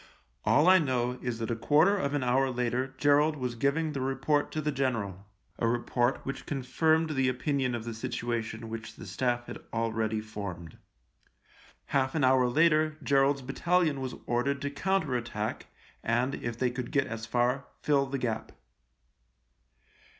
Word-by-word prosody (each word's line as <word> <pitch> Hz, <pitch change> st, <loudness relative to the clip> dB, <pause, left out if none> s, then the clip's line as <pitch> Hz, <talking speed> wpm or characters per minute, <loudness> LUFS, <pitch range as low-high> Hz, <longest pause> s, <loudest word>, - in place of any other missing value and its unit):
All 125 Hz, +10 st, +4 dB
I 185 Hz, 0 st, +8 dB
know 125 Hz, -4 st, 0 dB
is 125 Hz, -2 st, -2 dB
that 115 Hz, 0 st, -3 dB
a -, -, 0 dB
quarter 150 Hz, -, +4 dB
of 145 Hz, -7 st, -1 dB
an 145 Hz, -, 0 dB
hour 130 Hz, +2 st, +2 dB
later 125 Hz, +1 st, -1 dB
Gerald 145 Hz, +2 st, +4 dB
was 125 Hz, -4 st, -3 dB
giving 140 Hz, +6 st, 0 dB
the 140 Hz, -3 st, -3 dB
report 135 Hz, +3 st, 0 dB
to 155 Hz, -, -2 dB
the 150 Hz, 0 st, 0 dB
general 110 Hz, -8 st, -2 dB
— -, -, -37 dB
a 115 Hz, -, +2 dB
report 120 Hz, +1 st, +1 dB
which 135 Hz, -, -5 dB
confirmed 155 Hz, +4 st, +1 dB
the 135 Hz, -3 st, +2 dB
opinion 130 Hz, 0 st, 0 dB
of 115 Hz, -, -4 dB
the 115 Hz, 0 st, -5 dB
situation 115 Hz, 0 st, -3 dB
which 110 Hz, 0 st, -7 dB
the -, -, -10 dB
Staff 120 Hz, +5 st, -1 dB
had -, -, -7 dB
already 110 Hz, -1 st, -1 dB
formed. 100 Hz, -6 st, -7 dB, 1.1 s
Half 130 Hz, 0 st, 0 dB
an 150 Hz, -, +1 dB
hour 130 Hz, -1 st, +5 dB
later 155 Hz, +3 st, +3 dB
Gerald's 140 Hz, 0 st, +3 dB
battalion 155 Hz, +2 st, +1 dB
was 130 Hz, -1 st, -4 dB
ordered 140 Hz, +4 st, 0 dB
to 145 Hz, -, -2 dB
counter 160 Hz, -2 st, 0 dB
attack 110 Hz, -3 st, -3 dB, 0.4 s
and, 120 Hz, +4 st, +1 dB
if 120 Hz, -3 st, -4 dB
they 125 Hz, 0 st, +1 dB
could 125 Hz, -1 st, -5 dB
get 140 Hz, -2 st, +2 dB
as 115 Hz, 0 st, -6 dB
far, 125 Hz, +3 st, +1 dB, 0.2 s
fill 140 Hz, -2 st, +3 dB
the 135 Hz, +1 st, -2 dB
gap. 115 Hz, -4 st, -3 dB
130 Hz, 165 wpm, -29 LUFS, 115-145 Hz, 1.1 s, I